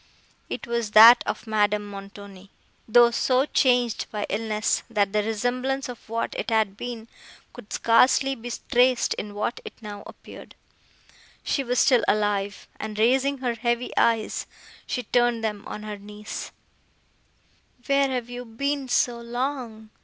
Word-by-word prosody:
It - - -5
was 235 -2 -2
that 235 +3 +10
of - - -3
Madame 210 -1 +1
Montoni, 200 -1 -11 0.4
though 235 +1 +6
so 255 +3 +2
changed 245 -6 +1
by 210 -1 -3
illness, 215 +1 -1
that 205 -3 0
the 210 - +2
resemblance 250 +5 -2
of 245 -3 -10
what 230 +1 -2
it - - -4
had 220 -3 +1
been, 230 0 -7 0.5
could 205 - -13
scarcely 255 +4 +3
be 240 -1 -7 0.2
traced 250 0 +3
in 205 0 -7
what 215 +3 -2
it - - -9
now 205 -3 -8
appeared. - - -13 0.9
She 275 - -1
was 250 0 -2
still 255 -2 +4
alive, 205 -1 0
and, 215 -1 -6
raising 265 +5 +2
her 240 - +1
heavy 235 +1 -2
eyes, 225 -2 +1 0.4
she 250 - -3
turned 240 0 +1
them 210 -1 -3
on 210 - -7
her 210 -1 -6
niece. 210 +1 -8 1.3
"Where 275 0 +2
have 250 -3 -3
you 245 0 -7
been 275 +4 -3
so 245 -1 +1
long?" 235 -3 -4
230 Hz, 145 wpm, -25 LUFS, 210-245 Hz, 1.3 s, that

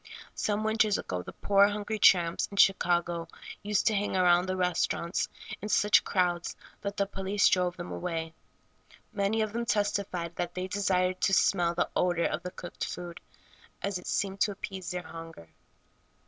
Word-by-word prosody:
Some 210 0 -1
winters 215 -1 +2
ago 90 -1 -4
the - - -9
poor, 200 0 +4
hungry 210 +1 -3
tramps 170 -4 +4
in 200 - -10
Chicago 175 -3 +3 0.3
used 210 -1 0
to 220 - +3
hang 205 -2 0
around 180 0 +4
the 185 - -1
restaurants 180 -1 0 0.3
in 210 - -5
such 210 0 +4
crowds 175 -2 0 0.3
that 200 0 -4
the 200 - +2
police 195 +1 +1
drove 180 -1 +1
them 175 0 -7
away. 165 -2 -4 0.8
Many 200 +2 +1
of 215 -1 -4
them 235 0 -2
testified 200 -6 -1
that 175 0 -3
they 185 0 -3
desired 185 -2 0
to 195 - +3
smell 175 -4 +2
the - - +1
odor 175 -2 +2
of 155 - -1
the 180 - -5
cooked 180 -1 -7
food, 175 -1 -6 0.6
as 195 -2 -1
it - - -12
seemed 195 0 -1
to 210 - +3
appease 190 -2 -6
their 180 0 -4
hunger. 165 - -10
185 Hz, 170 wpm, -29 LUFS, 175-205 Hz, 0.8 s, poor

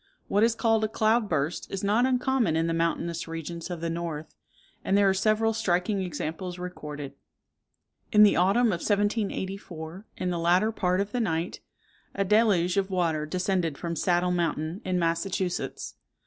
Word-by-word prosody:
What 205 - +2
is 230 +1 +4
called 225 -2 +2
a - - +2
cloud 220 0 +1
burst 155 +1 -1
is 195 0 -4
not 215 +5 +3
uncommon 250 -7 +1
in 165 0 +1
the 165 - 0
mountainous 170 0 -1
regions 165 +1 -6
of 175 -2 -5
the 170 - -1
north; 165 -2 -5 0.5
and 195 - +2
there 200 -1 +5
are 190 - +4
several 215 +3 +2
striking 195 -2 0
examples 175 +1 -4
recorded. 150 -6 -7 1.0
In 210 0 +7
the 210 - +6
autumn 200 +7 +3
of 175 -5 -1
1784, 195 -4 -2
in 180 - -1
the 175 - -2
latter 180 +6 +3
part 185 -3 0
of 200 +1 -3
the 245 - -1
night, 170 -5 -1 0.6
a 195 - 0
deluge 200 -4 +3
of 195 0 +1
water 165 -5 0
descended 180 -3 -1
from 170 -1 -4
Saddle 180 0 +1
Mountain, 170 +1 -1
in 185 -1 -1
Massachusetts. 180 +2 -2
180 Hz, 165 wpm, -27 LUFS, 170-205 Hz, 1.0 s, In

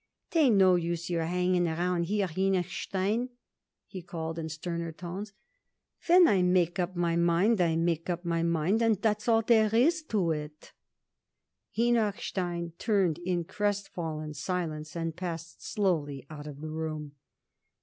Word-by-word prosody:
'Tain't 290 -9 +4
no 190 -2 +6
use 170 0 -1
your 165 -1 0
hanging 180 +1 +1
around 170 +1 0
here, 205 +2 0
Henochstein," 190 +5 -1 0.6
he 185 - -8
called 165 -1 -5
in 160 0 -4
sterner 170 +1 -4
tones. 180 +5 -7 0.8
"When 355 0 +7
I 195 -3 +3
make 180 0 +2
up 180 +1 -1
my 170 -1 +1
mind 175 +5 +3
I 165 -2 +2
make 165 +1 0
up 175 0 -2
my 170 -1 0
mind, 170 +6 +1
and 225 -4 +3
that's 210 0 0
all 225 -1 +4
there 220 -1 +4
is 320 +8 +4
to 190 - 0
it." 150 0 -6 1.0
Henochstein 195 -7 0
turned 195 -7 +1
in 175 -1 -1
crestfallen 175 -5 -3
silence 155 -2 -4
and 165 -1 -3
passed 170 -2 -6
slowly 155 - -1
out 150 -1 -8
of 145 -1 -9
the 155 0 -5
room. 155 -2 -4
175 Hz, 145 wpm, -29 LUFS, 165-200 Hz, 1.0 s, When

